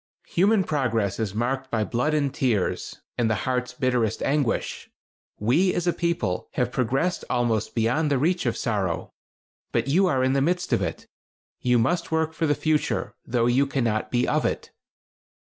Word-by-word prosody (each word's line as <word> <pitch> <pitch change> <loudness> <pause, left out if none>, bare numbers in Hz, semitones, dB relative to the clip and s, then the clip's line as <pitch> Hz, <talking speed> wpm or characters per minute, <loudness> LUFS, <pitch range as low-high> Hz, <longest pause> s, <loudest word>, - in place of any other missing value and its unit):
Human 200 +3 +3
progress 115 - 0
is 105 -3 -2
marked 130 +4 -1
by 110 -3 0
blood 125 +8 0
and 140 -3 0
tears, 115 -8 -1 0.2
and 115 -2 +2
the 110 - +2
heart's 125 -1 -1
bitterest 125 -4 0
anguish. 140 -4 -1 0.5
We, 160 - +2
as 175 - -1
a 175 - +2
people, 165 - -1
have 125 -1 0
progressed 135 +8 0
almost 115 -3 0
beyond 125 +7 +1
the 140 - +2
reach 170 +2 +1
of 115 - 0
sorrow, 100 -7 -2 0.6
but - - 0
you 185 +7 +3
are 130 -5 +2
in 130 0 +2
the 135 - +2
midst 180 +4 0
of - - +2
it. 85 -3 -3 0.5
You 125 -1 +2
must 170 +10 0
work 160 0 +1
for 160 0 0
the 145 - +2
future, 155 0 0
though 120 -1 +1
you 130 +4 +3
cannot 115 -6 0
be 125 +1 +1
of - - +1
it." - - -2
130 Hz, 175 wpm, -25 LUFS, 115-155 Hz, 0.6 s, Human